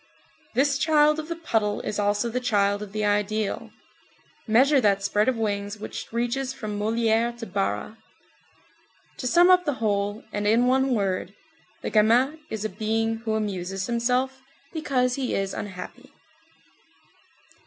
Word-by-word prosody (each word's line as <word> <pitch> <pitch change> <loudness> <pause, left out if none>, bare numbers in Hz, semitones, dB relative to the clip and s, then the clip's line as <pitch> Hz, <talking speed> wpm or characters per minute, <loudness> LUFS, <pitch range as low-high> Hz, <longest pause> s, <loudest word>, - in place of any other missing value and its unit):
This 275 +2 +2
child 300 0 +4
of 310 - -5
the 335 - -3
puddle 220 -11 -1
is 210 - -3
also 205 +3 +1
the 240 +2 -2
child 205 -4 +1
of 210 -2 -7
the 215 0 -1
ideal. 210 0 -1 0.8
Measure 265 +5 +5
that 200 -3 +2
spread 205 +4 +2
of 260 - 0
wings 205 -2 -2
which 210 - -7
reaches 245 +3 -1
from 215 -6 -5
Molière 230 +2 +1
to 230 - -6
Barra. 200 +2 -3 1.2
To 250 - -3
sum 350 +6 +6
up 365 0 +5
the 290 -4 0
whole, 205 -1 -1
and 205 0 -1
in 230 +3 +4
one 265 0 +2
word, 195 -1 -2 0.5
the - - -3
gamin 240 +8 +3
is 220 -1 -4
a - - +2
being 225 +1 -1
who 225 -1 -2
amuses 195 -3 -3
himself, 250 +3 0 0.3
because 255 -6 0
he 260 -2 -1
is 195 0 -1
unhappy. 185 -3 -8
225 Hz, 150 wpm, -25 LUFS, 205-255 Hz, 1.2 s, sum